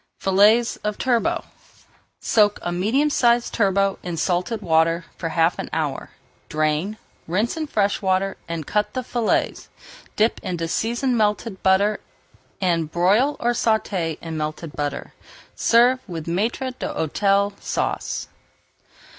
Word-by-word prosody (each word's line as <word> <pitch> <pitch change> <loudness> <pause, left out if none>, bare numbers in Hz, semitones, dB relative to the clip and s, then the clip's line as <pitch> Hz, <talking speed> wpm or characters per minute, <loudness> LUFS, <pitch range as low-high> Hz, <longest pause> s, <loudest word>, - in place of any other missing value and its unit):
FILLETS 210 +5 +4
OF 210 -1 -3
TURBOT 245 -3 0 0.7
Soak 210 -2 +3
a 175 - -2
medium 225 +12 +1
sized 240 -3 +2
turbot 195 -2 +1
in 175 -2 -5
salted 180 +6 0
water 165 0 +2
for 165 - -4
half 165 +1 +1
an - - -4
hour, 155 -3 -2 0.4
drain, 155 +7 0 0.3
rinse 205 +8 0
in 315 -1 -3
fresh 205 -6 0
water, 190 0 +1
and 165 -2 -4
cut 210 +5 +1
into 255 - -1
fillets. 240 -2 -1 0.5
Dip 220 +2 +2
in 180 - -3
seasoned 235 +6 0
melted 210 -1 0
butter 200 +2 +3 0.6
and 170 -4 0
broil 205 - +2
or 240 - +1
sauté 205 -9 0
in 165 -1 -5
melted 155 +1 -4
butter. 145 -1 -4 0.4
Serve 245 +2 +4
with 165 -3 -5
Maître 225 +9 -1
d'Hôtel 200 +5 +1
Sauce. - - -2
195 Hz, 130 wpm, -22 LUFS, 170-230 Hz, 0.7 s, FILLETS